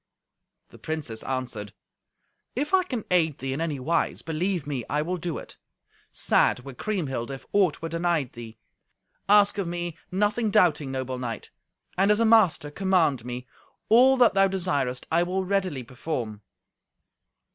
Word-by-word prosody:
The - - -16
princess 150 -8 -4
answered, 125 -6 -4 0.8
"If 290 +8 -2
I 380 - +6
can 255 - -4
aid 160 -5 +2
thee 135 0 -3
in 145 - -3
any 155 -4 -2
wise, 160 +5 -1
believe 165 0 -1
me, 140 -4 -3
I 150 +2 0
will 180 +3 -2
do 175 -1 -3
it; - - -10 0.5
sad - - +2
were 135 +1 -9
Kriemhild 140 - -3
if 135 -1 -7
aught 185 -7 +2
were 165 - -2
denied 165 -5 0
thee. 115 -2 -10 0.7
Ask 205 0 +5
of 190 - -1
me, 175 -1 -4
nothing 210 +4 +1
doubting, 165 -9 +3
noble 130 -1 -3
knight, 120 -3 -5 0.5
and, 195 +1 +4
as 210 +1 +4
a 230 - +3
master, 210 -10 +4
command 170 - +1
me; 125 +1 -6 0.4
all 255 +4 +6
that 245 -2 +5
thou 195 0 +5
desirest 145 -10 -1
I 165 +1 +4
will 185 +2 -1
readily 185 -8 -1
perform." 120 -4 -5
165 Hz, 155 wpm, -26 LUFS, 130-195 Hz, 0.8 s, I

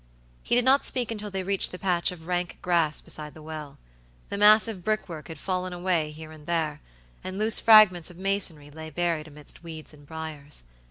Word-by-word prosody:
He - - +1
did 245 0 +3
not 270 +2 +5
speak 245 -3 -1
until 210 -2 -4
they 190 -1 -3
reached 195 +1 0
the 180 - -6
patch 180 -2 +1
of 165 -3 -11
rank 175 0 -2
grass 170 -4 +1
beside 150 -1 -7
the 155 - -11
well. 155 -2 -7 0.5
The - - -3
massive 210 -2 +5
brickwork 175 -7 -2
had 160 - -8
fallen 185 -1 -2
away 175 -3 0
here 155 +1 -10
and 155 -1 -14
there, 160 -3 -1 0.4
and 185 +1 -5
loose 215 +2 +3
fragments 210 -7 +7
of 175 - -13
masonry 185 -6 -1
lay 160 +1 -8
buried 165 0 -1
amidst 150 -1 -12
weeds 160 -2 -9
and 145 -1 -17
briars. 155 - -6
170 Hz, 195 wpm, -27 LUFS, 155-195 Hz, 0.5 s, fragments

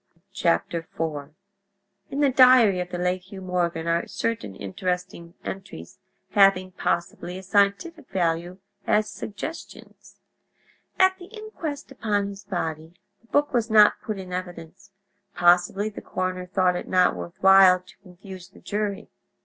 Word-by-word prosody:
IV 170 -4 +2 1.5
In 280 - -3
the 280 -2 +4
diary 250 -7 +6
of 180 0 -4
the 180 - -4
late 180 +1 -1
Hugh 190 +1 -11
Morgan 175 -3 -1
are 170 0 0
certain 220 - -3
interesting 175 - -5
entries 135 - -8 0.3
having, 195 -2 +4
possibly, 175 0 -3
a 190 - -9
scientific 205 - 0
value 175 0 -1 0.3
as 215 0 +2
suggestions. 210 +13 -9 0.8
At 375 0 +3
the 355 - -10
inquest 365 -10 -7
upon 205 -6 -1
his 200 0 -10
body 165 -3 -4 0.3
the 230 - -28
book 290 +3 +1
was 235 -2 0
not 210 -1 +5
put 215 -2 -4
in 185 -1 -8
evidence; 180 +1 -7 0.5
possibly 175 +3 +3
the 215 - -7
coroner 185 0 -4
thought 185 -1 +1
it - - -5
not 185 -1 +3
worth 175 - -8
while 190 -1 +7
to 185 - -19
confuse 185 -1 -12
the - - -18
jury. 205 -1 -3
190 Hz, 140 wpm, -24 LUFS, 180-210 Hz, 1.5 s, while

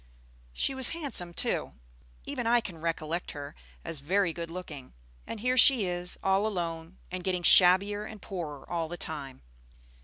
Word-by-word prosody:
She 165 - 0
was 265 -2 +3
handsome, 265 - -1
too. - - 0 0.5
Even 240 - -3
I 240 +1 +5
can 175 -8 -8
recollect 165 +1 -3
her 145 -1 -7 0.3
as 160 - -4
very 175 +4 +1
good 170 0 -6
looking. 160 -7 -8 0.3
And 220 - -6
here 250 +2 +1
she 245 -5 +7
is, 180 0 -3
all 195 +2 +2
alone, 170 -3 -4
and 180 0 -5
getting 180 -1 -1
shabbier 200 +4 +5
and 215 0 -9
poorer 165 -8 -7
all 165 -2 -2
the 175 +2 -6
time. 140 - -6
180 Hz, 160 wpm, -29 LUFS, 165-205 Hz, 0.5 s, she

